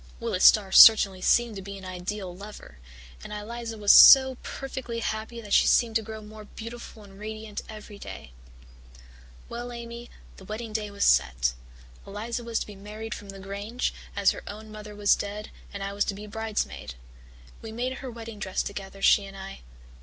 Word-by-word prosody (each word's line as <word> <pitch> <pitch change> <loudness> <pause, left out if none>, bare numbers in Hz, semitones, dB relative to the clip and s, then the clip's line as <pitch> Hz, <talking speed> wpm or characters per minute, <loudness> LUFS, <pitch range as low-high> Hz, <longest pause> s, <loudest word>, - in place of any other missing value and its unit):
"Willis 230 -6 0
Starr 200 -3 +6
certainly 195 -4 +8
seemed 240 +2 +3
to - - -6
be 200 +1 -8
an 190 - -11
ideal 185 +1 -5
lover, 200 - -12 0.4
and - - -9
Eliza 225 +2 -6
was 205 -1 +5
so 265 -1 +9
perfectly 265 -3 -6
happy 220 +1 -4
that 205 -2 -5
she - - +5
seemed 230 -2 +3
to 225 - +3
grow 220 0 -8
more 215 0 -11
beautiful 230 0 -10
and 195 -1 -15
radiant 215 0 -6
every 210 -1 -10
day. 75 - -9 1.2
"Well, 240 +1 -6
Amy, 235 0 -8 0.3
the - - -13
wedding 215 +3 -6
day 210 -1 -2
was 200 0 -1
set. 65 -3 +3 0.5
Eliza 225 +4 -5
was 230 -1 -2
to - - -3
be 210 - -11
married 215 +2 -7
from 200 - -10
the 195 - -8
Grange, 200 +5 -4 0.2
as - - +4
her - - -7
own 215 +1 -9
mother 210 -1 -9
was 205 0 +4
dead, 205 +1 -6 0.2
and 200 -1 -6
I 200 0 -4
was 205 0 +1
to 200 - -3
be 210 +1 -9
bridesmaid. 215 - -4 0.7
We 225 - -8
made 250 +3 -3
her 265 - -7
wedding 230 -2 -9
dress 190 -2 -2
together, 195 -1 -8
she 205 - +5
and 195 0 -11
I. 195 0 -9
210 Hz, 185 wpm, -26 LUFS, 200-230 Hz, 1.2 s, so